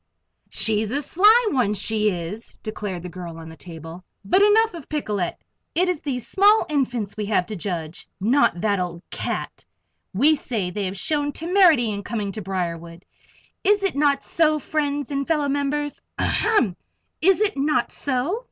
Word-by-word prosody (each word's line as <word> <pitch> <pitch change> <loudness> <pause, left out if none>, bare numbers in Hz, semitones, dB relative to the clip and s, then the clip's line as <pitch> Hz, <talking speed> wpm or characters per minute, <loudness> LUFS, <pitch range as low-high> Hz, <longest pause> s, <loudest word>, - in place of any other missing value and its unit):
"She's 215 -1 0
a 280 - 0
sly 420 - +5
one, 235 -7 +1
she 215 +1 +2
is," 180 +4 -6
declared 205 -5 -5
the - - -5
girl 170 -1 -8
on 165 0 -9
the 160 - -11
table. 165 +1 -10 0.2
"But, 370 - +3
enough 435 +2 +5
of 330 -5 -10
Picolet. 210 - -2 0.4
It 365 +2 +3
is 360 -5 -1
these 255 -5 -4
small 410 +3 +4
infants 245 -8 -1
we 210 -2 -3
have 200 -4 +2
to 215 - -6
judge; 170 -4 -5
not 215 - +2
that 205 -2 +1
old 175 -1 -4
cat. - - -4 0.5
We 275 +11 +4
say 225 -10 -2
they 200 +2 -3
have 190 +1 -4
shown 290 +7 0
temerity 330 - +4
in 200 -1 -3
coming 205 -2 -3
to 215 - -5
Briarwood 170 -2 -4 0.6
is 405 0 +3
it 390 - +1
not 280 -1 +2
so, 310 -2 +2
friends 290 -1 -2
and 275 -1 -2
fellow 300 -3 +1
members 285 +1 -1 0.2
ahem! 260 - +2 0.5
is 380 +3 +4
it 425 -1 +1
not 275 -3 +1
so?" 280 - -1
245 Hz, 170 wpm, -23 LUFS, 195-305 Hz, 0.6 s, sly